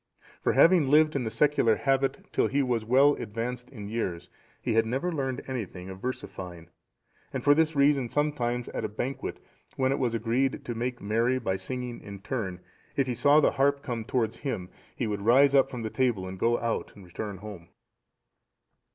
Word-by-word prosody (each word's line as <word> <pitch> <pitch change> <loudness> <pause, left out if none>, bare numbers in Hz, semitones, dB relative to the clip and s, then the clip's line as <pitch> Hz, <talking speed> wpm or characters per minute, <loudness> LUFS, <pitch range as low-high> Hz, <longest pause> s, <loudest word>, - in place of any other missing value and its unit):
For - - +2
having 165 -5 +5
lived 155 +1 +5
in 130 -3 0
the - - -1
secular 140 -4 +3
habit 135 +1 0
till - - +3
he 140 0 +1
was 120 -4 0
well 135 +6 +5
advanced 120 +2 -5
in 105 -7 -8
years, 100 -6 -3 0.3
he 120 - -1
had 115 0 +4
never 135 +10 -1
learned 135 -5 -2
anything 95 -8 -5
of 95 0 -10
versifying; 90 -8 -6 0.6
and - - -4
for 145 - +6
this 160 +1 +2
reason 140 -3 +3
sometimes 125 -5 -1
at - - -4
a 110 - -2
banquet, 125 +6 -4 0.4
when 130 0 +1
it 135 - 0
was 120 -3 0
agreed 130 +5 0
to 120 - -3
make 120 +2 -3
merry 115 +5 +1
by 100 -7 -1
singing 125 +5 -5
in 100 -1 -8
turn, 95 -5 -4 0.3
if 135 - +2
he 125 - -2
saw 145 +6 +5
the - - +4
harp 140 +1 +1
come 120 -3 -3
towards 115 -1 -1
him, 115 -11 -4 0.3
he 125 - -2
would 105 -2 -2
rise 130 +6 +5
up 135 -1 +5
from 120 -4 -4
table 120 -8 0
and 95 0 -7
go 120 +4 +2
out 115 0 -2
and 100 - -13
return 100 +3 -6
home. 95 -4 -10
120 Hz, 190 wpm, -28 LUFS, 110-135 Hz, 0.6 s, for